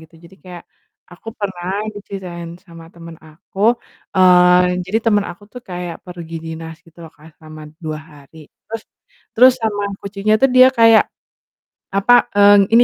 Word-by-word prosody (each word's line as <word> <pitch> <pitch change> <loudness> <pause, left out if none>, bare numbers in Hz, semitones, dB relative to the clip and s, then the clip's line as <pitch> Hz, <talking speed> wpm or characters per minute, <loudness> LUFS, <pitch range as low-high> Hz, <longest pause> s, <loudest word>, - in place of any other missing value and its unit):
gitu, 160 +1 -18
jadi 170 +3 -17
kayak, 175 -2 -11 0.5
aku 185 +5 -13
pernah 190 -4 -5 0.3
diceritain 185 -4 -8 0.2
sama 165 -2 -14
temen 165 -1 -12
aku, 165 +5 -13 0.6
eee, 180 0 +4
jadi 210 +4 0
temen 210 -2 +2
aku 175 +4 -13
tuh 250 - -9
kayak 175 -1 -6
pergi 170 -2 -9
dinas 160 0 -8
gitu 165 +1 -22
loh 160 - -14
Kak, 155 +2 -17
selama 155 -1 -13 0.2
2 155 -1 -4
hari, 145 +1 -18 0.3
terus 225 0 -7 0.5
terus 255 +3 +6
sama 205 -2 -2 0.2
kucingnya 200 +2 -1
tuh 270 - +5
dia 255 - +8
kayak, 225 -1 +6 0.9
apa, 200 +5 +3 0.2
eee, 205 0 +7 0.2
ini 235 +1 +7
180 Hz, 155 wpm, -17 LUFS, 165-205 Hz, 0.9 s, dia